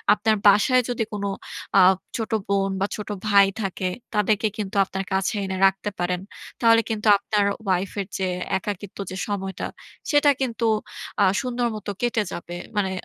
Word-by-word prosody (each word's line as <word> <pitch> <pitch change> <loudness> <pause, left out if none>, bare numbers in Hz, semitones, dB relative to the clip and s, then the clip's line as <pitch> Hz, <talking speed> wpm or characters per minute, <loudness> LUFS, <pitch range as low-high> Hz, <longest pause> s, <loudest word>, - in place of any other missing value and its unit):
আপনার 215 +1 +1
বাসায় 230 +6 +6
যদি 245 -2 -1
কোন 205 -1 -3 0.5
আ - - +8 0.4
ছোট 225 -2 -3 0.2
বোন 195 -1 +1
বা 195 - +2
ছোট 210 - -7 0.2
ভাই 200 -1 +7 0.2
থাকে 190 -1 -2 0.3
তাদেরকে 210 +1 +2
কিন্তু 205 0 -4
আপনার 195 0 -4
কাছে 190 +2 +1
এনে 190 0 -3
রাখতে 195 +2 0
পারেন। 180 0 -1 0.4
তাহলে 230 -1 +6
কিন্তু 220 0 -2
আপনার 205 0 0 0.2
ওয়াইফের 190 +1 -1
যে 190 - 0 0.3
একাকিত্ব 200 +1 -6
যে 185 - -6
সময়টা 195 -1 -3 0.5
সেটা 290 -1 +5
কিন্তু 235 -3 -1 0.6
আ - - +6 0.2
সুন্দর 245 -2 -1
মত 210 - -8 0.2
কেটে 235 -3 +1
যাবে। 175 0 -6 0.2
মানে 195 -2 +1
205 Hz, 155 wpm, -24 LUFS, 195-225 Hz, 0.6 s, আ